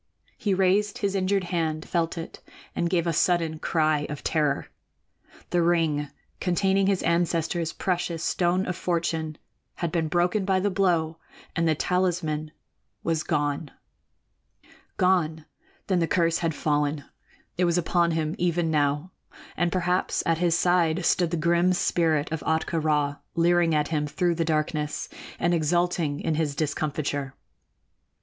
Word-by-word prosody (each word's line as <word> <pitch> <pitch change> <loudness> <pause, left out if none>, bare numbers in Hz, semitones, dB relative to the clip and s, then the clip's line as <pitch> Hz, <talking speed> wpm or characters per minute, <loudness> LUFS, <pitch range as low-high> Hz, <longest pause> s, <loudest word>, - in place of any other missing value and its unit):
He 205 -6 0
raised 195 +2 +2
his 200 -2 -1
injured 195 0 +1
hand, 160 -3 -2
felt 170 -1 -1
it, 165 - -7 0.4
and 170 - 0
gave 170 -2 +1
a 170 - 0
sudden 165 -1 +1
cry 155 -3 +1
of 150 - -6
terror. 150 -3 0 0.9
The 175 - +3
ring 160 -4 +1 0.3
containing 190 +2 +2
his 195 -2 +1
ancestor's 170 0 0
precious 175 -3 -2
Stone 180 +2 +1
of 180 - -3
Fortune 165 -3 -2 0.4
had 170 -2 -3
been 165 -2 0
broken 180 +5 +1
by 190 -1 +2
the 200 +2 0
blow 170 -4 +1 0.4
and 165 0 +1
the 160 - +3
talisman 165 -3 -1 0.5
was 165 -1 0
gone. 145 -1 -1 1.3
Gone! 165 -4 +1 0.4
Then 185 -3 +1
the 165 - +1
curse 165 -1 +2
had 165 -3 -1
fallen. 150 -1 0 0.6
It 180 - +4
was 170 0 +2
upon 175 0 +2
him 160 -1 -1
even 170 -1 +1
now, 145 +3 0 0.4
and 175 0 +1
perhaps 180 0 0
at 165 -1 +1
his 170 -1 +2
side 175 -1 +2
stood 175 0 +2
the 170 - -1
grim 170 +3 +3
spirit 160 -4 +1
of 160 - -2
Ahtka 160 +1 0
Rā, 150 -2 +1 0.2
leering 170 -1 +3
at 150 -1 +1
him 150 -2 0
through 175 +3 0
the 165 0 -1
darkness 155 -1 -1 0.3
and 175 0 +1
exulting 170 -2 +1
in 160 - -1
his 150 -2 -1
discomfiture. 145 -2 -2
165 Hz, 145 wpm, -26 LUFS, 155-175 Hz, 1.3 s, It